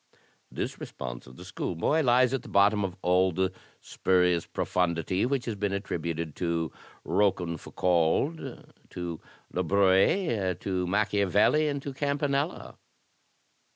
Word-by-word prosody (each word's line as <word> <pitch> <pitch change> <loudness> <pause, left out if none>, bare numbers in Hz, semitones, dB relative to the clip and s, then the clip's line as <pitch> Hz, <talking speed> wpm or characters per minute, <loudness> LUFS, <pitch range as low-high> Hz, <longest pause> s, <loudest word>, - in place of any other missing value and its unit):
* - - -38
This - - -4
response - - -7
of 65 - -13
the 90 - -11
schoolboy 90 - 0
lies 125 -1 +4
at 135 - -1
the - - -12
bottom 100 +1 +4
of 95 -2 -3
all 90 +1 +3
the 95 +2 0 0.3
spurious 90 -2 +1
profundity 90 +3 0
which 135 -1 -1
has 115 - -2
been 100 -1 -2
attributed 85 -5 -3
to 85 -2 -1 0.3
Rochefoucauld, 90 - 0 0.2
to 85 -2 -5 0.3
LaBruy^re, 95 - +2
to 90 -2 -1
Machiavelli, 105 - +2
and 140 -2 -2
to 140 - -5
Campanella." 140 +2 -2
95 Hz, 120 wpm, -28 LUFS, 85-120 Hz, 0.3 s, lies